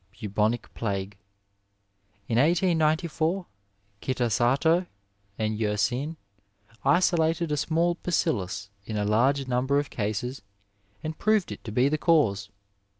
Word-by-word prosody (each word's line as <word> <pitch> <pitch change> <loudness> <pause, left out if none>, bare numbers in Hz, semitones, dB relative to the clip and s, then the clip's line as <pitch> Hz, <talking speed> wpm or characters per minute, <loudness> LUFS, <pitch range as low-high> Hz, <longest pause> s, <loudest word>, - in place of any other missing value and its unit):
Bubonic 105 +3 -1
Plague. 100 -2 -3 0.6
— 100 0 -42
^In 115 - 0
1894 165 +2 +2 0.6
Eitasato 130 - +2 0.5
and 110 -1 -1
Tersin 120 +8 0 0.7
isolated 170 -2 +2
a - - +2
small 165 +4 +1
bacillus 100 - -1
in 110 +1 -4
a 105 - 0
large 130 +6 +2
number 130 +3 +1
of 145 0 -1
cases 110 +4 -3 0.6
and 155 0 -5
proved 215 -3 +2
it - - -8
to 110 - -5
be 125 +5 +3
the 155 +1 0
cause. 110 - +2
130 Hz, 115 wpm, -27 LUFS, 105-160 Hz, 0.7 s, be